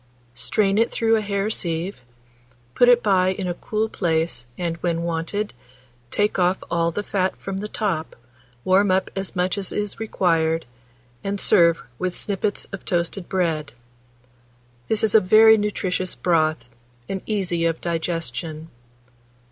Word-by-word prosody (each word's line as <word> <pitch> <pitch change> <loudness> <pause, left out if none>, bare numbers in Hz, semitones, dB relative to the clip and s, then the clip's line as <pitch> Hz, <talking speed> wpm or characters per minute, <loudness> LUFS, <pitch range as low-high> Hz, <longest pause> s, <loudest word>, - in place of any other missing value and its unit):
Strain 195 - +1
it 230 - +3
through 225 -1 +2
a 220 - +1
hair 200 0 -1
sieve; 170 0 -2 0.8
put 245 - +5
it 245 -1 +5
by 190 -3 +3
in 190 -1 -4
a 175 - -1
cool 215 +5 -2
place, 160 - -1
and, 170 -2 -2
when 170 -1 -1
wanted, 170 +5 -2 0.6
take 205 +5 0
off 180 +1 +3
all 170 -1 +2
the 185 +5 -3
fat 190 -2 0
from 195 -1 -5
the 205 +2 -4
top, 190 -7 -2 0.5
warm 190 +2 +4
up 185 0 +1
as 195 0 -3
much 180 +3 0
as 195 - -4
is 205 -1 -3
required, 165 -6 +1 0.6
and 200 0 -2
serve 170 -6 +4 0.2
with 185 -1 -2
sippets 205 0 -2
of 195 - -7
toasted 175 +1 -2
bread. 165 -5 -1 1.1
This 220 - 0
is 220 - +2
a 220 - +8
very 220 +4 +7
nutritious 190 -3 -2
broth, 155 -7 +1 0.4
and 190 -1 -3
easy 180 -6 0
of 165 -1 0
digestion. 165 -1 -4
185 Hz, 150 wpm, -23 LUFS, 165-205 Hz, 1.1 s, a